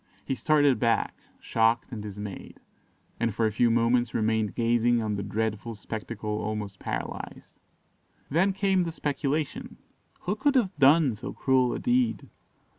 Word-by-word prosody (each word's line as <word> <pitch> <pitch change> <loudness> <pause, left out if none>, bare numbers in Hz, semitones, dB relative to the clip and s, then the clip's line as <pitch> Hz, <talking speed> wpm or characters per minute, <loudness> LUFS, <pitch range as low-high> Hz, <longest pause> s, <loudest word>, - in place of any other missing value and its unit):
He - - -1
started 145 -1 +3
back, 115 -2 +1 0.3
shocked 115 +2 +1
and 115 -4 -5
dismayed, 105 -1 -8 0.6
and 115 -3 0
for 115 - +1
a 110 - +1
few 115 +3 +3
moments 120 +1 +2
remained 110 -2 0
gazing 120 0 +2
on 110 -2 -1
the 100 - -3
dreadful 110 +2 -3
spectacle 105 0 -5
almost 105 -2 -4
paralysed. - - -6 0.7
Then 180 +7 +2
came 195 -1 +1
the 170 -2 -2
speculation 145 -1 -3 0.4
who 190 +4 -1
could 280 +6 +1
have 205 -7 +2
done 140 -1 +5
so 110 +4 -7
cruel 130 -2 +2
a - - -2
deed? 250 -1 0
120 Hz, 145 wpm, -27 LUFS, 110-150 Hz, 0.7 s, done